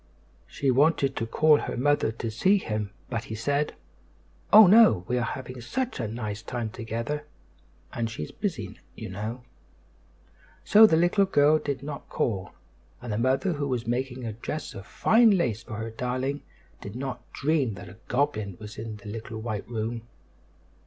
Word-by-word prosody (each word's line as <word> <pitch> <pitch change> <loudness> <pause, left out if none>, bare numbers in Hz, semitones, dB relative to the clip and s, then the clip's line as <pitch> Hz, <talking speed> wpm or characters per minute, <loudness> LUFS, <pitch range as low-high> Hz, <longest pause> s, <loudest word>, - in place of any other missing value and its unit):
She 135 -2 0
wanted 140 0 +3
to 115 - -2
call 150 +4 +4
her - - -4
mother 145 -2 +2
to 115 0 -5
see 190 - +3
him; 105 - -3 0.2
but 115 -2 -3
he 110 - -6
said: 145 +6 -1 0.8
"Oh! 215 +1 +10
no; 205 - +6
we 125 - 0
are - - -1
having 125 +1 -5
such 255 - -3
a - - -1
nice 105 -2 -5
time 120 -2 -4
together, 115 +6 -4 0.7
and 115 -1 -2
she's 75 -9 -6
busy, - - -4 0.2
you - - -7
know." 110 +6 -5 1.2
So 220 +1 +8
the 160 - +3
little 175 +4 +3
girl 155 -4 +4
did 140 -2 -4
not 145 0 -7
call; 95 -5 -1 0.5
and 120 -3 -5
the 105 - -1
mother, 135 +9 +1
who 145 -2 -2
was 125 -3 -2
making 125 +1 -2
a 110 - -3
dress 145 +7 -5
of 95 - -9
fine 225 -3 +4
lace 120 - 0
for 115 - -8
her 110 +1 -5
darling, 130 +4 -2 0.4
did 100 +2 -8
not 130 -1 -6
dream 140 -6 0
that 90 0 -10
a 90 +3 -12
goblin 110 -8 -1
was 105 0 -9
in 110 -1 -5
the 105 - -13
little 110 +1 -6
white 110 -2 -4
room. 115 0 -4
125 Hz, 175 wpm, -27 LUFS, 110-145 Hz, 1.2 s, Oh